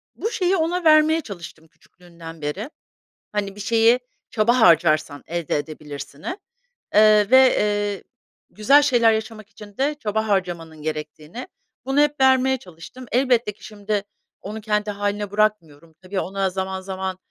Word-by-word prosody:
bu 445 - -3
şeyi 370 -3 +1
ona 345 +1 -1
vermeye 315 0 +5
çalıştım 170 - -10
küçüklüğünden 165 0 -14
beri. 180 - -4 0.6
Hani, 200 -2 -3
“Bir - - -12
şeyi 230 +3 +3 0.3
çaba 235 +2 +2
harcarsan 155 -6 +3
elde 170 -3 -2
edebilirsin”i, 145 - -7 0.6
eee, 210 -1 +6
ve, 260 0 +6
eee, 205 -1 -1 0.5
güzel 275 +8 +4
şeyler 240 -5 +3
yaşamak 220 -1 -5
için 210 -2 -14
de 285 +3 0
çaba 220 -1 -2
harcamanın 175 -6 -2
gerektiğini. 155 +7 -6 0.4
Bunu 270 +2 +1
hep 295 0 +1
vermeye 265 0 +4
çalıştım. 180 +4 -12
Elbette 245 -3 +2
ki, 205 - -22
şimdi, 205 -1 -3 0.4
onu 215 +2 -7
kendi 210 0 -1
hâline 205 0 -3
bırakmıyorum. 170 -7 -1
Tabii, 190 +1 -4
ona 195 +1 -2
zaman 190 0 -4
zaman, 190 -1 -5
205 Hz, 140 wpm, -22 LUFS, 175-240 Hz, 0.6 s, eee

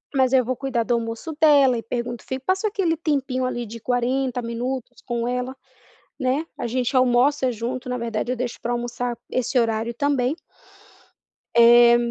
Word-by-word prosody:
mas 260 -2 +3
eu 255 -3 +4
vou 255 - -1
cuidar 255 -3 -1
do 240 - 0
almoço 230 +6 -3
dela 285 -5 +6
e - - -3
pergunto 240 0 -4
fico 260 0 -6
passa 380 +3 +1
aquele 385 -5 0
tempinho 275 -5 -1
ali 240 -1 -3
de 230 +2 -9
40 250 +2 0
minutos 245 +2 -4
com 235 -1 -2
ela, 250 +1 -2 0.7
né. 265 +5 0
A - - -2
gente 255 +2 -1
almoça 255 +2 +3
junto, 245 +2 -4
na 250 0 -2
verdade 230 0 -3
eu - - -3
deixo 245 0 -4
pra 240 - -3
almoçar 240 0 -3
esse 255 +1 0
horário 225 0 0
também. 280 +1 0 1.2
Eh, 235 0 +8
250 Hz, 170 wpm, -23 LUFS, 235-265 Hz, 1.2 s, Eh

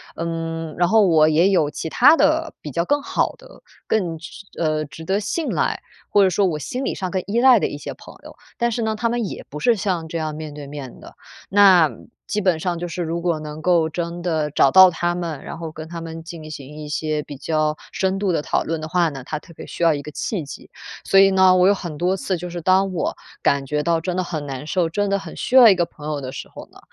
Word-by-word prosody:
嗯， 165 -1 -4
然 175 0 +3
后 220 0 +5
我 155 -3 +5
也 165 +5 +4
有 165 -6 +2
其 160 - -5
他 290 - +6
的 320 +1 +1
比 150 - -7
较 170 +6 -1
更 290 0 +1
好 - - 0
的、 - - -17 0.2
更 175 -7 -1
值 170 +4 -11
呃， 155 -2 0
值 145 +4 -11
得 195 +4 0
信 300 +10 -2
赖， - - -1 0.3
或 205 - +4
者 190 - +4
说 195 +3 +1
我 160 -4 0
心 250 - -4
理 - - -2
上 185 -2 -4
更 190 -1 -1
依 230 +4 +1
赖 255 -4 +7
的 - - 0
一 145 - -6
些 - - -7
朋 - - -14
友， - - -11 0.2
但 235 0 +1
是 230 - -2
呢， 220 -1 -1
他 230 +1 -1
们 235 -1 -1
也 - - -7
不 150 - -7
是 235 +8 +3
像 185 -5 -2
这 165 - -4
样 155 -1 -3
面 155 -1 -7
对 145 -1 -9
面 140 -3 -9
的。 - - -13 0.3
那 190 -7 +6 0.4
基 210 - -1
本 180 -4 +2
上 175 0 -2
就 175 - -4
是 175 +1 -4
如 170 +1 -3
果 170 -3 0
能 155 0 -8
够 170 -2 +3
真 170 +1 -5
的 160 -4 0
找 135 -1 +3
到 190 0 +9
他 175 0 -1
们， 170 -5 -5
然 165 - -8
后 165 -2 -6
跟 155 0 -9
他 170 0 -7
们 165 0 -7
进 160 -2 -9
行 145 -1 -9
一 150 -1 -8
些 150 0 -1
比 145 -2 -9
较 155 0 -1
深 190 0 -1
度 195 -2 0
地 155 - 0
讨 - - 0
论 160 0 -3
的 155 - -5
话 170 0 +2
呢， 135 -3 -8
它 155 - -4
特 170 +3 -14
别 - - -10
需 175 - -5
要 165 -2 +5
一 145 - -4
个 150 - -9
契 175 +2 -3
机。 140 - -11 0.3
所 195 - +4
以 195 0 +7
呢， 190 -1 +5
我 180 0 +5
有 200 - +5
很 170 -6 -7
多 185 +2 +1
次 185 0 -2
就 175 +1 -6
是 175 0 -6
当 190 +2 +3
我 170 - -2 0.3
感 140 -1 +2
觉 150 +1 -1
到 165 -1 +1
真 180 +1 -3
的 185 - +1
很 155 -4 -5
难 135 +1 -6
受、 170 0 0
真 205 +5 -1
的 200 - +1
很 - - -10
需 255 - -2
要 240 -4 +10
一 195 - +5
个 175 -1 +1
朋 150 -3 -11
友 150 -2 -2
的 130 -1 -6
时 130 - -8
候 - - -11
呢， - - -17
170 Hz, 285 characters per minute, -21 LUFS, 155-190 Hz, 0.4 s, 要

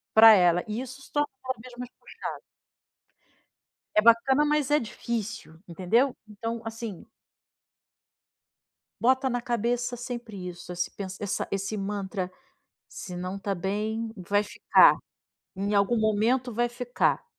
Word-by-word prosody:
pra 220 0 +10
ela 175 -3 +4
e 215 +2 -3
isso 260 +1 -9
se - - -16
torna 290 0 +1 0.2
cada 260 -2 -3
vez 250 +1 -12
mais 250 0 -7
puxado. - - -7 1.6
É - - +8
bacana, 235 +5 +5
mas 300 -2 +1
é 295 - +6
difícil, 225 - -5
entendeu. 220 +10 +2
Então, 225 +2 -5
assim 225 -4 -6 1.9
bota 260 +2 +3
na 245 -1 -1
cabeça 240 +1 -1
sempre 235 -6 -6
isso, 175 0 -8
esse 175 0 -2
pens 190 -1 -7
essa 200 -2 -2
esse 200 +2 -2
mantra: 195 -2 -3 0.6
"Se 180 - -8
não 185 +2 -4
tá 195 0 -2
bem, 215 +5 -2
vai 205 +2 +1
ficar. 210 - +5 0.6
Em 200 +2 -1
algum 200 +4 +3
momento 225 +4 +1
vai 240 +2 +1
ficar". 245 - 0
220 Hz, 135 wpm, -27 LUFS, 195-245 Hz, 1.9 s, pra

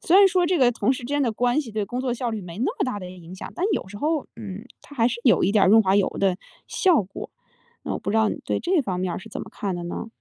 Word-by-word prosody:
虽 355 +3 +4
然 400 - +8
说 365 -1 +2
这 360 0 +1
个 250 -2 +5
同 255 - +1
事 - - -4
之 240 - -7
间 290 +1 0
的 235 -4 +1
关 245 +5 +1
系 240 -6 -8
对 215 -1 -1
工 245 +5 -4
作 255 -2 -1
效 245 -1 -2
率 220 -2 -3
没 175 +1 -9
那 245 - 0
么 - - +2
大 250 -5 -3
的 180 -2 -7
影 180 0 -11
响， - - -8
但 355 - -2
有 - - -3
时 205 - -9
候 305 +1 0
嗯， 210 -1 -7 0.2
它 290 - -14
还 230 0 +4
是 235 - -4
有 235 - +5
一 200 - +2
点 210 - +5
儿 - - +4
润 220 +2 +7
滑 190 0 +3
油 200 - +3
的 190 -2 +2 0.3
效 350 - +3
果。 190 +1 -9 0.5
那 - - -3
我 - - -2
不 - - -4
知 220 - +1
道 220 -1 +4
你 - - -5
对 - - -1
这 350 -2 +2
方 185 -5 -3
面 185 -2 -1
儿 - - -4
是 225 +4 -12
怎 - - -6
么 - - -9
看 195 -3 -3
的 175 - -5
呢？ 175 - -5
225 Hz, 345 characters per minute, -24 LUFS, 195-260 Hz, 0.5 s, 然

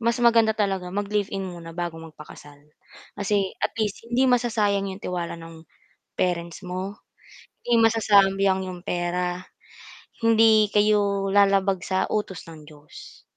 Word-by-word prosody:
mas 235 +1 +1
maganda 230 -2 +4
talaga 195 -3 -1
mag-live-in 200 0 -2
muna 170 -2 -9
bago 170 -2 -4
magpakasal. 150 -2 -13 0.6
Kasi, 200 -1 0
at - - -1
least, 215 -3 -2
hindi 245 +2 +2
masasayang 215 -6 +1
yung 190 +1 -8
tiwala 175 -2 -4
no'ng 165 -1 -12 0.6
parents 170 -1 -2
mo, 185 +3 -6 0.7
'di 240 -1 +3
masasayang 195 -4 +3
yung 180 -1 -9
pera, 180 0 -2 0.8
hindi 220 -1 +5
kayo, 205 -2 +2
lalabag 195 -1 +3
sa 190 -1 0
utos 200 -4 -3
ng 160 -2 -12
Diyos. 150 -1 -14
195 Hz, 125 wpm, -24 LUFS, 180-210 Hz, 0.8 s, hindi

